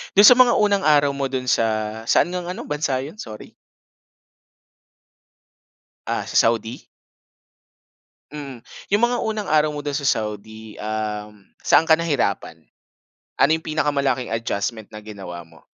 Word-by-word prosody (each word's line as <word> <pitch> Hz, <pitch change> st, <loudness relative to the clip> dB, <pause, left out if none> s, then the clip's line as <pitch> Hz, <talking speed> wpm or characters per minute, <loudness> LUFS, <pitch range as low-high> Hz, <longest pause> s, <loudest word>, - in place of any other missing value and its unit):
Do'n 205 Hz, +2 st, +9 dB
sa 250 Hz, -, +9 dB
mga 250 Hz, -1 st, +5 dB
unang 200 Hz, -2 st, +2 dB
araw 145 Hz, -2 st, +3 dB
mo 135 Hz, -1 st, -3 dB
do'n 130 Hz, -1 st, -3 dB
sa 115 Hz, -2 st, +2 dB, 0.4 s
saan 115 Hz, -, +3 dB
ngang 180 Hz, 0 st, -4 dB
ano, 185 Hz, -, -7 dB
bansa 145 Hz, -3 st, -1 dB
yun? 140 Hz, +7 st, -7 dB
Sorry. 110 Hz, -, -10 dB, 2.5 s
Ah, -, -, -2 dB
sa -, -, -8 dB
Saudi? 115 Hz, +1 st, +1 dB, 1.5 s
Mm, 140 Hz, -5 st, -8 dB, 0.2 s
yung 205 Hz, +2 st, +1 dB
mga 245 Hz, 0 st, +2 dB
unang 215 Hz, -1 st, -3 dB
araw 150 Hz, -1 st, +2 dB
mo 145 Hz, -, -5 dB
do'n 145 Hz, -, -3 dB
sa 140 Hz, 0 st, -1 dB
Saudi, 110 Hz, 0 st, -4 dB
um, 105 Hz, -1 st, -5 dB, 0.2 s
saan -, -, +4 dB
ka 160 Hz, 0 st, +4 dB
nahirapan? 100 Hz, -, -2 dB, 0.7 s
Ano 150 Hz, -, +3 dB
'yong 160 Hz, 0 st, 0 dB
pinakamalaking 140 Hz, -6 st, 0 dB
adjustment 115 Hz, -1 st, -3 dB
na 105 Hz, 0 st, -9 dB
ginawa 95 Hz, -5 st, -8 dB
mo? 80 Hz, -1 st, -20 dB
135 Hz, 140 wpm, -22 LUFS, 110-155 Hz, 2.5 s, Do'n